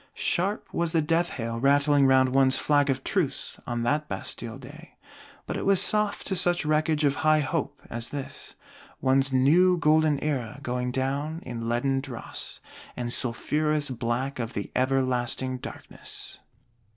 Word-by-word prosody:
Sharp 195 +5 -1
was 170 -1 0
the 165 - +3
death 165 +3 +1
hail 115 -1 -4
rattling 140 +1 +4
round 130 -1 +4
one's 135 -1 +4
Flag 145 -1 +2
of 135 0 -1
truce, 180 -9 -1
on 120 -1 -2
that 150 +5 0
Bastille 115 +1 -3
day: 145 +6 -13 0.5
but - - -4
it - - -3
was 195 -2 +4
soft 210 -1 +1
to 190 - -1
such 175 -2 +3
wreckage 155 0 +1
of 140 -1 +2
high 155 -1 +3
Hope 145 0 -3
as 115 0 -3
this; 140 -2 -7 0.4
one's 135 +1 +2
New 165 +8 +4
Golden 155 -2 +3
Era 135 -5 -3
going 125 0 -2
down 140 +5 -2
in 115 -1 -5
leaden 135 +3 +1
dross, 130 -4 -7 0.4
and 120 -1 -2
sulphurous 150 +4 -1
black 125 +3 -2
of 115 0 -4
the 100 - -5
Everlasting 130 -1 0
Darkness! - - -8
140 Hz, 150 wpm, -26 LUFS, 125-155 Hz, 0.5 s, rattling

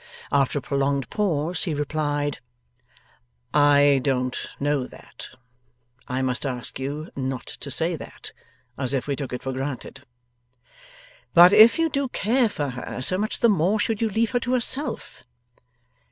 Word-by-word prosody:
After 140 0 +2
a 140 - -3
prolonged 140 -1 -1
pause, 175 -5 0
he 165 -5 -2
replied: 145 -1 -2 1.1
'I 145 -1 +5
don't 125 -2 0 0.2
know 145 -2 0
that. - - -12 0.8
I 130 +1 -2
must 125 -1 -1
ask 125 -4 -4
you 145 +4 -5
not 130 -2 -3
to - - -8
say - - -1
that, - - -10 0.5
as 130 0 0
if 130 - -2
we 140 - -1
took 135 -2 -6
it 125 - -5
for 135 - -3
granted.' 135 0 -5 1.3
'But 175 +2 +9
if 220 +2 +8
you 330 0 +2
do 280 -3 -1
care 240 +1 +1
for 145 -8 -3
her, 125 0 -6
so 185 +7 +1
much 215 +1 -2
the 235 - +6
more 200 +1 +2
should 220 +1 -1
you 225 - +1
leave 220 +2 0
her 245 - +1
to 245 +1 -2
herself. 260 +4 -1
145 Hz, 155 wpm, -24 LUFS, 135-210 Hz, 1.3 s, But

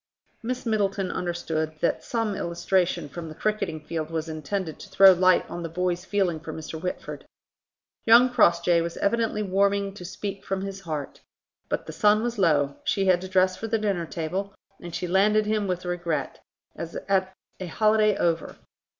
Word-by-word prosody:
Miss 250 +2 -4
Middleton 200 -4 0
understood 160 -3 -2
that 170 - 0
some 225 -3 -1
illustration 175 -2 0
from 165 +3 -7
the 155 - -9
cricketing 210 -7 -1
field 160 0 -4
was 165 0 -3
intended 160 +2 -4
to - - -11
throw 195 0 +8
light 185 0 +3
on 175 - -6
the 165 - -4
boy's 180 +1 -1
feeling 185 -4 0
for 160 0 -7
Mr. 160 0 -7
Whitford. 180 +1 -5 0.8
Young 240 +3 +7
Crossjay 170 -6 +4
was 170 0 -4
evidently 225 0 0
warming 200 0 +1
to 195 - -10
speak 195 +2 -6
from 195 0 -3
his 195 0 -6
heart. 155 -6 -5 0.5
But - - -2
the - - -7
sun 210 +1 +3
was 240 -2 -2
low, 145 -6 +2
she 195 - +1
had 180 -2 +4
to 190 - -6
dress 185 0 +3
for 225 - -5
the 225 0 +1
dinner 195 -6 -1
table, 185 +6 -4 0.3
and 175 -1 -7
she - - -2
landed 210 +4 +3
him 210 -1 0
with 180 -1 -3
regret, 170 -5 -2 0.4
as 165 0 -7
at 190 -1 +1 0.3
a 185 - -5
holiday 215 +2 +3
over. 165 -1 0
185 Hz, 175 wpm, -26 LUFS, 170-200 Hz, 0.8 s, throw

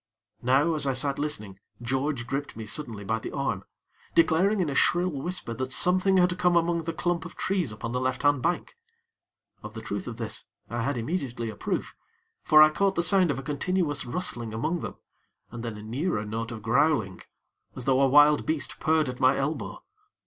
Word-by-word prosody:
Now 135 +7 +3
as 145 -3 0
I 135 - +2
sat 140 +1 0
listening, 105 -11 -4 0.2
George 130 +2 -1
gripped 135 0 -4
me 110 - -6
suddenly 110 -3 -4
by 110 +3 -1
the - - -6
arm, - - -2 0.5
declaring 185 +6 +4
in 180 - +1
a 140 - -2
shrill 175 +5 +3
whisper 150 -3 -4
that 130 +3 -4
something 185 +5 +3
had 180 0 +3
come 180 -1 +3
among 170 -1 +1
the 165 - -1
clump 175 0 -1
of 170 - -9
trees 185 - -1
upon 110 +2 -5
the 125 - -1
left 130 0 -1
hand 145 -2 +3
bank. 175 +6 -1 0.9
Of 105 +1 -9
the 110 - -6
truth 100 0 -4
of 115 -2 -6
this, 110 -3 -4 0.3
I 120 0 -2
had 135 +2 -1
immediately 120 -4 -3
a - - -11
proof; - - -3 0.5
for 155 0 +7
I 155 - +5
caught 195 +4 +1
the 170 - +1
sound 185 -1 +4
of 140 - 0
a 135 - -5
continuous 150 +2 -1
rustling 120 -6 -4
among 165 +10 -1
them, - - -6 0.6
and 115 0 -7
then 115 -3 -5
a 105 - -9
nearer 115 - -2
note 115 +2 -4
of 110 -3 -7
growling, 120 - +2 0.5
as 125 - -6
though 135 0 +3
a 135 - +5
wild 145 +2 +6
beast 155 -4 -3
purred 155 -1 +2
at 125 0 -5
my 130 +1 +4
elbow. 145 +3 -3
140 Hz, 200 wpm, -27 LUFS, 120-165 Hz, 0.9 s, for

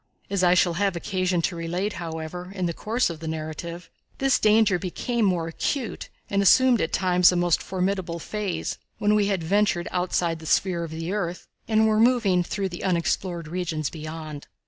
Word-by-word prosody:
As 195 -2 +1
I 180 0 +5
shall 175 -1 +3
have 195 -2 +1
occasion 185 -1 -1
to 175 - 0
relate, 175 +5 -2
however, 165 +2 -6
in 185 -2 -1
the 170 - -1
course 225 +3 0
of 160 - -8
the 160 - -6
narrative, 160 +2 -5 0.3
this 270 -1 +2
danger 215 -3 +4
became 225 +6 -2
more 175 -4 +1
acute 235 - -3 0.2
and 200 0 +1
assumed 250 +4 +5
at 165 - -1
times 180 -1 +4
a - - -1
most 175 -2 +2
formidable 185 -2 -2
phase, 200 +2 -4 0.2
when 210 0 +2
we 210 -1 +3
had 195 -4 -1
ventured 190 0 +1
outside 175 -2 0
the 160 - -9
sphere 175 0 +1
of 165 - -5
the 165 +2 -4
earth 180 -4 -3 0.2
and 220 0 +3
were 215 0 +2
moving 225 -6 +4
through 195 +2 -2
the 175 - -7
unexplored 170 -1 -1
regions 165 -3 -2
beyond. 155 -2 -7
180 Hz, 185 wpm, -25 LUFS, 170-200 Hz, 0.3 s, I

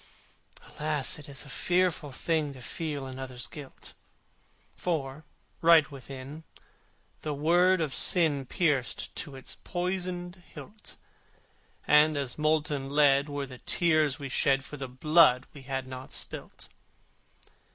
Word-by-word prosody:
Alas! 150 -2 -1
it 145 - -10
is 140 +1 -3
a - - -13
fearful 175 -2 0
thing 155 +1 -1
To 130 - -12
feel 150 -1 -4
another's 130 -1 -5
guilt! 145 -5 -10 0.8
For, 150 -4 -3 0.4
right 165 -2 +6
within, 135 +3 -9 0.8
the 155 - -4
sword 175 +5 +4
of 150 -5 -1
Sin 150 -6 +4
Pierced 150 -8 -1
to 145 - -5
its 130 - -5
poisoned 180 0 -3 0.2
hilt, 210 0 -10 0.9
And 150 0 +5
as 135 -3 -2
molten 150 -2 0
lead 140 0 +4
were 145 -1 -3
the 130 -2 -11
tears 155 -5 +2
we 140 -3 -6
shed 135 0 +1
For - - -8
the 135 -2 -5
blood 130 -1 +4
we 140 - -11
had 135 0 -4
not 130 0 -9
spilt. - - -6
145 Hz, 130 wpm, -29 LUFS, 135-160 Hz, 0.9 s, right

